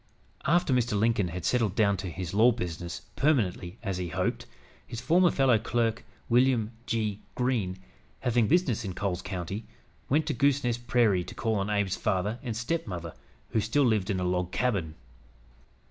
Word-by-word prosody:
After 170 0 +3
Mr. 120 -4 +1
Lincoln 110 -3 +2
had 85 0 -5
settled 115 -6 +1
down 100 -2 +3
to 95 0 -4
his 90 +2 -5
law 115 +4 +6
business, 85 - -5
permanently, 105 - +1
as 95 -4 -2
he 90 - -2
hoped, 80 - -2 0.4
his 115 - -6
former 170 +8 +4
fellow 135 -7 +3
clerk, 115 0 0 0.2
William 120 -2 +3 0.2
G. 105 -3 -1 0.2
Greene, 115 -8 0 0.4
having 120 -2 +2
business 140 - +2
in 95 -4 -5
Coles 95 -3 -2
County, 95 +2 -4 0.5
went 150 +4 +3
to - - -1
"Goosenest 125 -3 +1
Prairie" 110 -6 +3
to - - -9
call 115 -1 0
on 100 -1 -1
Abe's 100 -3 0
father 105 +3 -1
and 115 -3 -4
stepmother, 105 - -3 0.4
who 110 - +1
still 130 +7 +2
lived 110 -4 +1
in 95 -2 0
a - - -1
log 90 0 0
cabin. 100 -9 -1
110 Hz, 165 wpm, -28 LUFS, 95-125 Hz, 0.5 s, law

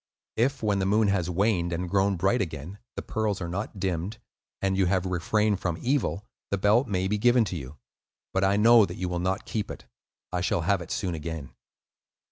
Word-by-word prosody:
If 125 +2 0
when 105 -2 +2
the 95 - 0
moon 105 +1 +3
has 90 -3 0
waned 90 -1 +1
and 90 +2 -2
grown 100 +1 +2
bright 95 +7 +2
again, 85 +2 -5 0.2
the - - -5
pearls 110 -3 -1
are 85 - -4
not 100 +3 -4
dimmed 95 +3 -2 0.4
and 95 -1 0
you 95 -1 +2
have 95 0 +1
refrained 100 +3 +1
from 85 -4 -2
evil, 120 - 0 0.2
the 100 - 0
belt 105 +7 +3
may 95 -3 0
be 105 +1 0
given 120 +1 +4
to 95 - -4
you. 70 -2 -7 0.6
But 95 - +1
I 100 +1 +3
know 115 +1 +7
that 90 - -7
you 90 - -2
will 90 0 -2
not 95 +2 -1
keep 105 -3 -3
it; - - -8 0.5
I 90 - 0
shall 90 -1 +1
have 95 +2 +1
it 85 - -8
soon 90 -4 -2
again." 80 -3 -5
95 Hz, 210 wpm, -27 LUFS, 90-105 Hz, 0.6 s, know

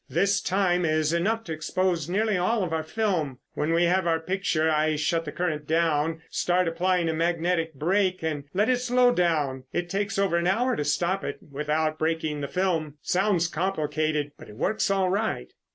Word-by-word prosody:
This 195 +8 +2
time 180 -2 +1
is 155 -1 +1
enough 215 +7 0
to 165 - -5
expose 170 +1 -1
nearly 210 +3 +1
all 195 +4 +1
of 170 -3 -3
our 160 - 0
film. 160 - -1 0.2
When 150 +2 -1
we 170 +1 +3
have 180 +1 +2
our 165 -1 +2
picture, 180 -2 0
I 155 0 +2
shut 165 +2 0
the 150 - -5
current 155 -4 -2
down, 160 0 +1
start 180 0 +1
applying 175 +1 +1
a 160 - 0
magnetic 165 0 0
brake, 185 +4 +1
and 150 -3 -2
let 205 +4 +1
it 255 - +3
slow 250 0 +3
down. 150 - 0
It 175 0 -3
takes 200 0 -1
over 195 -3 +2
an 170 0 0
hour 245 +7 +2
to 150 - -1
stop 175 +6 0
it - - -4
without 155 +2 -1
breaking 155 -2 -1
the 140 - -2
film. 165 -4 -1
It - - -9
sounds 185 -2 +2
complicated, 155 -4 -1
but - - -12
it 105 - -11
works 215 - 0
all 195 -2 +2
right." 215 +3 -2
170 Hz, 195 wpm, -26 LUFS, 155-190 Hz, 0.2 s, we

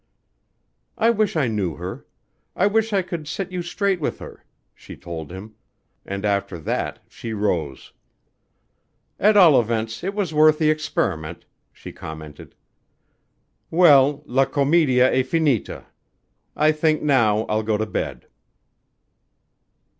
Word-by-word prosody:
"I 230 +1 +3
wish 215 -4 0
I 150 -5 +1
knew 100 -8 -2
her. - - -8 0.5
I 185 - +2
wish 220 +2 +1
I 195 -2 +1
could 170 -4 -6
set 180 +4 -5
you 180 -1 -3
straight 190 +1 -1
with - - -2
her," - - -12 0.3
she - - -12
told 80 -2 -8
him 100 +4 -10 0.5
and 100 +1 -4
after 100 -3 -1
that 80 - -3
she 115 -1 -7
rose. 85 -10 -3 1.3
"At 210 +1 +4
all 165 -10 +7
events 115 +1 -3
it 195 +2 -3
was 195 -7 -2
worth 155 0 +5
the 155 -1 +3
experiment," 90 - -3 0.3
she - - -11
commented. 80 -1 -10 1.1
"Well, 145 -4 +5
'la 135 0 +2
comedia 135 -2 +2
e 130 - +3
finita.' 140 -3 -1 0.7
I 155 +1 +3
think 155 0 0
now 115 -7 +3
I'll 110 0 -1
go 110 -1 -1
to 110 - -1
bed." - - -4
135 Hz, 130 wpm, -22 LUFS, 105-165 Hz, 1.3 s, all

